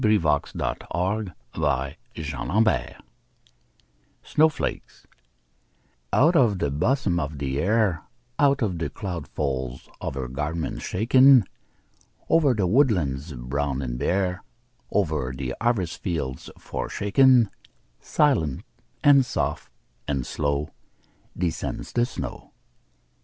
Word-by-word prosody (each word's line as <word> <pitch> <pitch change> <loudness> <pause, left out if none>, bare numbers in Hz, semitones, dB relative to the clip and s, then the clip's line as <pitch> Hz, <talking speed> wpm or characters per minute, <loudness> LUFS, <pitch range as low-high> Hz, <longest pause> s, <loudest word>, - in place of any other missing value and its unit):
Henry 110 -1 +5
Wadsworth 75 -5 -1 0.7
Longfellow 70 - -1 1.3
Snow 160 +1 +4
Flakes 150 - -5 1.1
OUT 160 +6 +4
of 115 - +4
the 70 -6 -1
bosom 100 - +1
of 75 0 -4
the 70 0 -2
Air 100 -3 +2 0.4
Out 140 -2 +3
of 90 -6 -1
the 85 - -2
cloud 90 -7 -5
folds 65 -3 -3
of - - -4
her 65 -2 -3
garments 75 +5 -3
shaken, 130 +5 +6 0.9
Over 145 -6 +4
the 100 -3 +1
woodlands 90 - +1
brown 70 +2 -2
and - - -4
bare, 90 +4 0 0.5
Over 75 -5 0
the 65 -1 -3
harvest 115 -8 0
fields 75 -9 -3
forsaken, 120 +2 +2 0.5
Silent, 80 - +1 0.4
and 140 -2 +7
soft, 125 - -3 0.4
and 70 -4 -1
slow 70 +3 -2 0.7
Descends 85 -2 -3
the 120 0 +2
snow. - - -7
85 Hz, 105 wpm, -25 LUFS, 70-115 Hz, 1.3 s, and